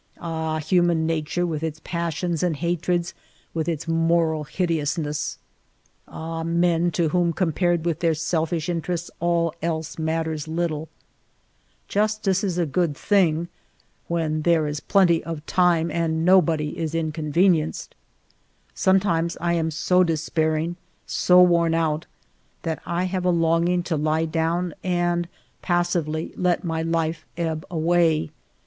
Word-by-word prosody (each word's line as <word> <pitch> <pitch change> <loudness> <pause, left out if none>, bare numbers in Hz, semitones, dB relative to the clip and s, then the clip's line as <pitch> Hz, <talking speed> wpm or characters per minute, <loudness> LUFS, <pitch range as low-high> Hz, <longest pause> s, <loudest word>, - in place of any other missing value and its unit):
Ahj 160 -2 -2
human 170 0 +2
nature 165 +2 -1
with 160 -3 -3
its 160 -1 -3
passions 170 -1 -2
and 175 -3 +1
hatreds, 175 +2 -1 0.4
with 165 0 -1
its 165 -1 -3
moral 165 -1 +1
hideousness! 155 -3 -2 0.7
Ah, 165 0 -5
men, 170 +1 +2
to 165 -1 0
whom, 175 +1 +2
compared 175 0 0
with 170 -3 0
their 165 -2 +2
selfish 160 +1 -1
interests, 175 0 -3
all 170 -1 +1
else 160 0 -3
matters 160 -1 -2
little! 160 -1 -2 1.0
Justice 210 -2 +1
is 185 -4 -1
a 175 - +2
good 155 -1 0
thing 170 -5 +2 0.3
— - - -39
when 160 -2 -1
there 165 -1 +3
is 150 0 -3
plenty 175 -3 +3
of 160 -2 -6
time 175 -2 +2
and 165 -1 0
nobody 165 -5 +3
is 160 -1 -2
inconvenienced! 160 +1 +1 0.8
Sometimes 170 -3 +1
I 170 0 0
am 165 -1 0
so 180 +3 +2
despairing, 160 0 0 0.3
so 180 0 +5
worn 170 -2 +3
out, 160 -1 0 0.6
that 160 -1 -3
I 175 +1 0
have 185 0 -2
a 180 - +2
longing 170 +1 +2
to 165 -2 -1
lie 155 +2 +1
down 165 +2 -1
and 175 -1 0 0.3
passively 175 -3 -1
let 180 0 +1
my 165 -2 -2
life 165 -1 -1
ebb 160 -2 -2
away. 165 - +2
165 Hz, 135 wpm, -23 LUFS, 160-175 Hz, 1.0 s, so